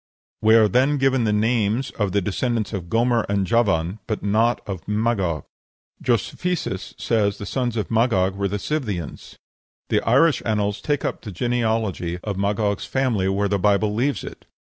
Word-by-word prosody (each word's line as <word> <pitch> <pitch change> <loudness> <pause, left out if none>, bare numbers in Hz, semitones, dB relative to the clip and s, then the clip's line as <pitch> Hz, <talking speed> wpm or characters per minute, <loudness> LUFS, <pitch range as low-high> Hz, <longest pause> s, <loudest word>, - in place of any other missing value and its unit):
We 110 +1 +5
are 110 -2 +6
then 130 +8 +2
given 135 -3 +2
the 105 - +2
names 110 +3 +1
of 105 -3 -2
the 100 - +1
descendants 115 +2 -1
of 90 -4 -5
Gomer 115 +1 +2
and 100 -1 +1
Javan, 100 -4 +1
but 110 - -3
not 110 +4 +2
of 95 -5 -6
Magog. 105 - 0 0.6
Josephus 125 - -2
says 105 -3 +1
the 100 - -7
sons 120 -1 -2
of 105 - -3
Magog 110 -5 +2
were 100 0 -1
the 100 +2 -2
Scythians. 105 - -4 0.5
The - - +2
Irish 140 +6 +3
annals 105 -2 -1
take 145 +2 -1
up - - -3
the 110 - -8
genealogy 110 -5 -1
of 105 -2 -3
Magog's 100 +1 0
family 120 -8 0
where 100 +1 +1
the 100 0 0
Bible 105 +2 +2
leaves 135 +6 0
it. - - -10
105 Hz, 165 wpm, -22 LUFS, 100-120 Hz, 0.6 s, are